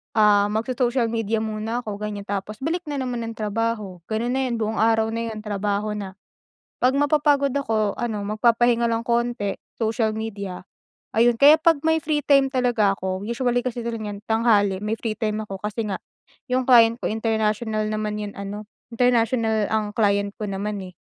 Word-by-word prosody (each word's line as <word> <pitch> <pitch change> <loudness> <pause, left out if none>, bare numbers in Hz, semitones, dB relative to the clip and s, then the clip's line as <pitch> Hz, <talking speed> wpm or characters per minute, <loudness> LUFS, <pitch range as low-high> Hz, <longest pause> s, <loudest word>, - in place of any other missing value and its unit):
ah, 205 -1 +5
magso-social 235 +2 0
media 225 -1 -1
muna 220 +3 -3
ako 205 -2 -5
ganyan 210 -1 -4
tapos 200 +1 -4
balik 330 +4 0
na 290 - -3
naman 245 -3 -3
ng 225 - -6
trabaho, 215 -3 -2
gano'n 225 +3 -1
na 265 - 0
yon 240 - -1
buong 220 -1 -2
araw 225 0 +3
na 230 +1 -2
'yon 215 -1 -6
trabaho 205 0 -1
na. 200 -3 -5 0.7
Pag 260 +2 +3
mapapagod 290 -2 +2
ako 220 -7 0
ano 215 -4 -3
magpapahinga 235 +1 +3
lang 230 +1 -2
konti, 235 -4 0 0.2
social 225 -1 +1
media 200 -4 -5 0.5
ayun. 235 +1 +5
Kaya 290 +4 +8
pag 325 -2 +3
may 320 0 +4
free 295 0 0
time 275 -1 +4
talaga 245 -6 +2
ako 190 0 -3
usually 245 +2 0
kasi 245 -1 -3
talaga 230 -2 -3
nyan 200 - -7
tanghali 215 -4 +3
may 215 +1 -1
free 225 -2 -3
time 215 -1 -1
ako 195 -1 -6
kasi 210 +1 -3
nga 195 -2 -3 0.5
yung 255 0 +1
client 235 -2 +6
ko - - -1
international 220 0 0
naman 215 0 -2
yung 205 -1 -6
ano 205 +1 -6 0.2
international 230 -2 +2
ang 215 -1 0
client 200 -2 +2
ko 210 - -3
naman, 200 +1 -3
eh, 185 -1 -10
225 Hz, 175 wpm, -23 LUFS, 210-240 Hz, 0.7 s, Kaya